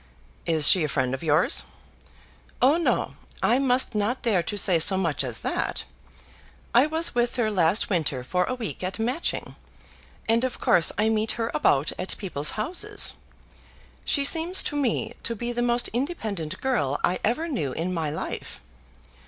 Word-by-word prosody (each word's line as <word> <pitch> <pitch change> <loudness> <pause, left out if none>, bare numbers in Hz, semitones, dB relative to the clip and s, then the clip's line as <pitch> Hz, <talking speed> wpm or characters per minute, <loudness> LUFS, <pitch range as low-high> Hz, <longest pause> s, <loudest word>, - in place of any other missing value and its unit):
"Is 160 -3 +3
she 180 - +6
a - - 0
friend 130 -3 -1
of 130 - -4
yours?" 165 - +2 1.0
"Oh 275 +6 +4
no; 340 - -1 0.3
I 245 - +3
must 255 -2 +2
not 215 +4 -1
dare 210 -7 +2
to 205 +5 -5
say 185 -4 +4
so 190 +4 +4
much 165 -7 0
as 120 -4 -4
that. - - -2 0.9
I 250 +5 +5
was 320 +2 +1
with 240 0 0
her 225 -3 0
last 185 +1 +2
winter 150 -8 -1
for 180 +8 0
a 255 - -3
week 225 -6 -5
at 185 +1 -3
Matching, 250 +9 -2 0.7
and 230 +2 +2
of 255 - -2
course 170 - +4
I 215 +2 +2
meet 220 0 +1
her 230 -1 -3
about 145 -1 +2
at 185 - -2
people's 165 -6 -1
houses. 370 - -2 0.9
She 280 -2 +1
seems 335 +5 +4
to 295 - -4
me 275 -6 -1
to 230 - -3
be 240 +2 -3
the 240 0 -2
most 240 0 +2
independent 220 - -4
girl 145 - 0
I 180 - +1
ever 275 +10 0
knew 225 - -2
in 175 +6 -3
my 160 -3 -2
life. 150 - -6
215 Hz, 170 wpm, -25 LUFS, 165-250 Hz, 1.0 s, she